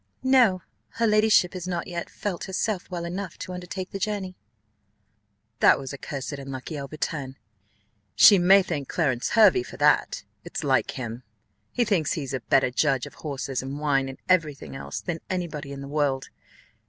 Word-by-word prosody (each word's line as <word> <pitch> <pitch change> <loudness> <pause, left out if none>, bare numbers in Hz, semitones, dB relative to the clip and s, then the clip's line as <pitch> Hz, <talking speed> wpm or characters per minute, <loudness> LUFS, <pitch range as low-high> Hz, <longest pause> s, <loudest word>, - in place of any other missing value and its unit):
"No: 245 -9 +4 0.3
her 230 - 0
ladyship 215 -4 +4
has 185 -1 -6
not 175 -2 -2
yet 175 -2 -5
felt 195 -4 -4
herself 190 0 -2
well 175 -1 -4
enough 180 +1 -5
to 185 - -6
undertake 180 +1 -6
the 195 - -5
journey." 195 -2 -3 1.2
"That - - +6
was 135 0 -7
a - - -6
cursed 140 0 -5
unlucky 135 +2 -6
overturn! 140 -1 -4 0.8
She 200 -3 +8
may 190 +2 +6
thank 150 -7 -4
Clarence 130 -8 0
Hervey 210 - +7
for - - -10
that: - - +2 0.2
it's - - -5
like - - +2
him, 120 -1 -5 0.5
he 245 - +1
thinks 185 -9 +1
he's 140 -6 -4
a 130 - -1
better 125 +2 +2
judge 135 -1 +1
of - - -11
horses, 135 -3 -4
and 135 +2 -5
wine, 135 -3 +1
and 135 - -8
every 165 -6 +3
thing 135 - -10
else, - - -6
than 175 -3 -4
any 180 -2 -1
body 150 -3 -7
in 140 0 -7
the 140 - -7
world. 140 -2 -1
165 Hz, 180 wpm, -25 LUFS, 135-185 Hz, 1.2 s, She